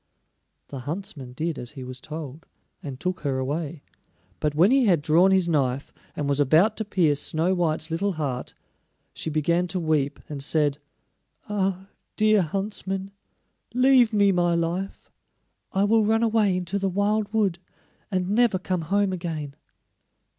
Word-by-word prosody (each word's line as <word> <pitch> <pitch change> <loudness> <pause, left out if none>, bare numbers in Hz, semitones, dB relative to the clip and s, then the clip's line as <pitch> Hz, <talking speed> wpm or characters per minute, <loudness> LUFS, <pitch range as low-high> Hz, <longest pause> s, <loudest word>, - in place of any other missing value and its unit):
The 135 - -6
huntsman 145 - -6
did 160 +3 -3
as 120 +2 -6
he 135 -3 -8
was 130 0 -8
told, 155 0 -8 0.3
and 135 -3 -7
took 180 0 -2
her 140 -3 -1
away; 145 +3 -3 0.6
but 150 -1 -1
when 180 +8 +5
he 265 -1 +4
had 175 -5 +4
drawn 165 +5 +4
his 190 -2 +3
knife, 140 -5 0 0.2
and 145 - -2
was 140 0 +1
about 160 - +4
to 220 - -3
pierce 165 -8 +2
Snow 165 +4 0
white's 165 -2 -1
little 195 +4 0
heart, 140 -6 -4 0.6
she - - -4
began 170 +4 +1
to 180 +1 -2
weep, 155 -4 0
and 140 -2 -5
said: 145 -1 +1 0.7
"Ah, 195 -2 -1 0.3
dear 215 -1 +4
huntsman, 195 +2 -3 0.6
leave 255 -2 +5
me 205 -2 +4
my 175 -2 +2
life! 170 +3 -3 0.6
I 195 - +1
will 220 +2 +4
run 225 +2 +2
away 215 -4 +2
into 185 +2 -2
the 195 0 0
wild 205 +2 0
wood, 200 -6 +1 0.5
and 185 -3 -1
never 220 0 +3
come 185 -1 -2
home 195 +4 +1
again." 160 -5 -5
175 Hz, 155 wpm, -25 LUFS, 150-200 Hz, 0.7 s, when